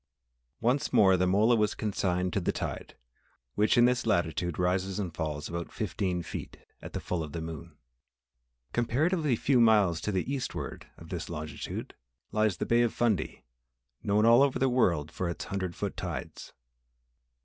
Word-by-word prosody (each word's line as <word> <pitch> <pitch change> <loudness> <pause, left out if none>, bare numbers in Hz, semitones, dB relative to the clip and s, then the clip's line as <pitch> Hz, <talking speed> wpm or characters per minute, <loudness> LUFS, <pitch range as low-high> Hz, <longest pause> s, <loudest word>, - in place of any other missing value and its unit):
Once 130 +6 +1
more 95 -2 +6
the 90 0 +2
mola 105 +6 +4
was 105 -2 +1
consigned 90 -3 -1
to - - +1
the - - +1
tide, - - -5 0.6
which 105 +4 +2
in 120 - +7
this 125 -1 +1
latitude 85 -3 0
rises 90 +2 0
and 95 -6 -3
falls 75 -3 -3
about 85 0 -5
fifteen 90 -3 -2
feet - - -7 0.2
at - - -9
the - - -2
full 90 -2 -3
of 75 -2 -6
the 85 - -3
moon. 80 -2 -8 1.0
Comparatively 145 +4 +1
few 130 +2 +2
miles 105 -8 +4
to 105 - -2
the 95 -2 -1
eastward 135 -2 -5
of - - -13
this - - -5
longitude 75 0 -6 0.4
lies 110 -3 +1
the - - -2
Bay 120 0 +3
of 120 -2 +2
Fundy 110 -7 -1 0.6
known 105 +2 +2
all 115 +2 +7
over 140 -1 +3
the 135 - +2
world 85 - +2
for 90 - -3
its 85 - -5
hundred 95 -3 -3
foot - - -3
tides. - - -6
100 Hz, 170 wpm, -29 LUFS, 85-120 Hz, 1.0 s, in